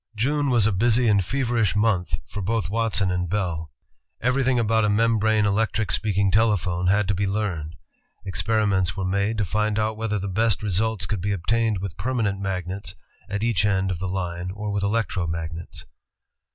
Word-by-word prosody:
June 140 +6 +1
was 120 -5 +4
a 110 - +3
busy 115 +5 +3
and 100 -3 +4
feverish 115 -4 0
month 105 -4 +1
for 105 - -5
both 100 -1 -1
Watson 110 -4 +1
and 90 -1 -1
Bell. 85 -5 -2 0.5
Everything 130 +1 +1
about 110 -1 +2
a 105 - +2
membrane 110 0 +3
electric 110 -1 0
speak 105 -3 0
ing 100 -1 +3
telephone 95 -5 +2
had 100 +1 +3
to - - +3
be 100 +1 0
learned. 95 -6 -2 0.5
Experiments 100 -1 0
were 95 - -2
made 100 +4 0
to 105 - +1
find 105 +3 0
out 110 0 0
whether 110 -1 -1
the 100 0 -3
best 110 +3 +1
results 105 +2 0
could 105 -5 -3
be 100 +3 -1
obtained 110 +4 0
with 95 -4 -5
permanent 110 -2 -1
magnets 95 0 -4 0.3
at 105 +1 -2
each 115 -5 +2
end 95 -2 +1
of 85 - -3
the 95 0 -3
line 90 -1 -3
or 105 0 -4
with 100 0 -1
electro 100 -4 0
magnets. 80 0 -6
105 Hz, 180 wpm, -24 LUFS, 95-110 Hz, 0.5 s, was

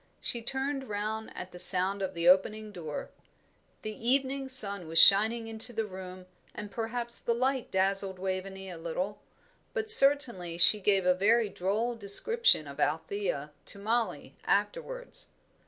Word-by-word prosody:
She 235 - -4
turned 265 +2 -4
round 215 +2 -5
at 180 0 -8
the 180 - -11
sound 185 +2 +4
of 190 -1 -5
the 170 0 -2
opening 210 +4 +2
door. 160 -6 -8 0.7
The 215 - -6
evening 265 +4 -2
sun 200 -8 +2
was 165 +1 -5
shining 220 +6 +5
into 225 +2 +4
the 225 0 -3
room, 185 -2 -11 0.3
and 210 -1 -8
perhaps 235 +1 -5
the 235 - -2
light 260 +1 -2
dazzled 195 0 -2
Waveney 190 +1 -6
a 175 -3 -9
little; 180 +5 -5 0.5
but 435 -2 +2
certainly 260 - +5
she 210 +4 +5
gave 195 -2 0
a 180 - +4
very 215 +4 +1
droll 210 +6 -3
description 225 - +2
of 140 +1 -11
Althea 160 -2 -3
to - - -2
Mollie 225 +3 -3
afterwards. - - -4
205 Hz, 150 wpm, -28 LUFS, 185-235 Hz, 0.7 s, shining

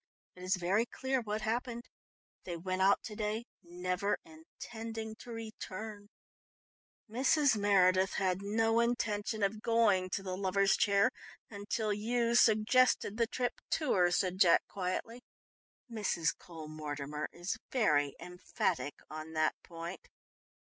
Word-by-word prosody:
It 180 - -13
is 185 +1 +1
very 190 +6 +1
clear 265 +1 -1
what 215 -1 -3
happened. 235 +2 -2 0.6
They 175 -2 -5
went 185 +2 -2
out 195 +1 +4
to 215 - -7
day, 215 +2 -2 0.2
never 180 +3 -2
intending 220 +7 -8
to - - -11
return 220 -2 -7 0.5
" - - -79
"Mrs. 270 +4 +3
Meredith 190 -2 +4
had 185 -1 0
no 225 +3 +2
intention 220 -3 0
of 210 +2 0
going 220 -6 +3
to 195 - -3
the 185 -1 -3
Lovers' 195 +1 +2
Chair 200 +4 +3 0.4
until 210 +1 -2
you 235 +3 0
suggested 220 -1 +4
the 230 -1 +2
trip 245 +1 -2 0.2
to 305 -5 0
her," 180 -2 +4
said 185 +1 0
Jack 170 -3 +5
quietly. 200 +6 -4 0.7
"Mrs. 205 -8 0
Cole 165 -3 -10
Mortimer 150 -1 -5
is 180 +5 -4
very 150 - +2
emphatic 180 -3 -2
on 155 +1 -8
that 155 0 +2
point." 170 +1 -8
200 Hz, 135 wpm, -33 LUFS, 180-225 Hz, 0.7 s, Jack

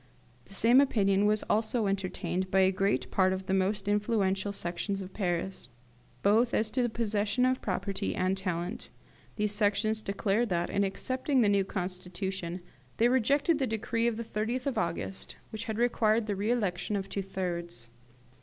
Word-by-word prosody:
The 195 - -12
same 240 +6 +6
opinion 205 -6 +3
was 215 0 +2
also 220 +1 +1
entertained 190 -1 -2
by 190 +1 +4
a 190 0 +5
great 195 +2 0
part 185 -1 +3
of 190 0 -4
the 190 - -1
most 195 +1 0
influential 205 -2 +1
Sections 195 +1 -3
of 190 -1 -8
Paris, 180 - -2 0.5
both 225 +4 +4
as 215 0 +1
to 255 - +1
the 240 - +1
possession 220 +1 0
of 255 0 +1
property 200 0 -2
and 185 +1 +1
talent. 185 +3 -3 0.5
These 210 -1 0
Sections 215 +1 +1
declared 200 +3 0
that, 175 -1 0
in 200 - +2
accepting 255 +7 0
the 210 - +4
new 200 -1 +3
constitution, 185 -1 -4 0.4
they 235 +2 +4
rejected 280 +6 +2
the 265 - +1
decree 230 +1 0
of 230 -2 0
the 230 - -3
30th 230 +4 -2
of 275 - 0
August, 170 +3 -3 0.2
which 220 0 -5
required 225 -1 +2
the 205 -2 -2
re 205 +3 -1
election 205 -4 0
of 195 -1 -2
two 195 0 -3
thirds. 170 -10 -5
205 Hz, 170 wpm, -30 LUFS, 190-225 Hz, 0.5 s, same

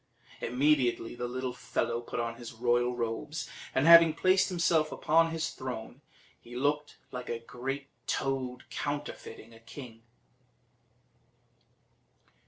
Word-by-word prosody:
Immediately 125 -2 +2
the 120 0 -4
little 130 0 -3
fellow 120 -1 -2
put 120 - -5
on 115 0 -2
his 120 -1 -8
royal 120 +1 +1
robes, 120 +6 -3 0.3
and 135 - +3
having 165 -1 +9
placed 185 +3 +4
himself 165 -3 +2
upon 165 +2 +3
his 165 0 -2
throne, 125 0 -6 0.4
he 120 +1 -11
looked 145 +3 0
like 125 -1 -6
a 120 - -1
great 135 +4 -5 0.2
toad 130 -2 -2
counterfeiting 145 -6 -5
a 115 - -14
king. 115 0 -10
130 Hz, 120 wpm, -30 LUFS, 120-150 Hz, 0.4 s, having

